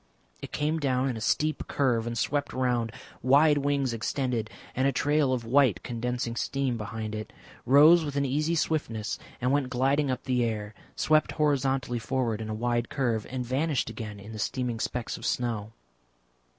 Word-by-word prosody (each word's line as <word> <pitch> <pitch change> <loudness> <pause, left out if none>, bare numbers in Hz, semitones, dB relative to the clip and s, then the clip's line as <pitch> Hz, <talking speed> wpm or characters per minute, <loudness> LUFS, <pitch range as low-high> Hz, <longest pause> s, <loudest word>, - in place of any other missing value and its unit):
It - - -7
came 155 +2 0
down 135 -2 +1
in 125 - -2
a 110 - -6
steep 155 +7 0
curve 120 -5 +1
and 120 0 -3
swept 145 +4 -1
round, 125 -3 0 0.3
wide 145 +3 +5
wings 140 -3 0
extended 115 -1 -1 0.3
and 130 +2 +2
a - - +3
trail 145 +1 +2
of 125 -3 -1
white 125 -6 +3
condensing 120 0 -3
steam 135 0 -1
behind 110 0 -5
it, 110 0 -5 0.4
rose 155 +6 +7
with 145 -2 -4
an 140 0 +1
easy 150 +5 0
swiftness 115 -10 -1 0.2
and 125 +1 +1
went 140 -2 +1
gliding 135 +3 +1
up 130 - -2
the 125 -2 +1
air, 105 -2 -3 0.2
swept 155 0 +2
horizontally 135 -4 +1
forward 115 -3 -1
in 110 - -5
a 110 - -2
wide 120 +1 0
curve, 120 -6 -1
and 125 -1 -3
vanished 135 -1 0
again 105 -2 -7
in 105 +2 -10
the 110 - -7
steaming 120 +1 -2
specks 120 +1 -3
of - - -8
snow. 110 -3 -1
125 Hz, 175 wpm, -28 LUFS, 115-140 Hz, 0.4 s, rose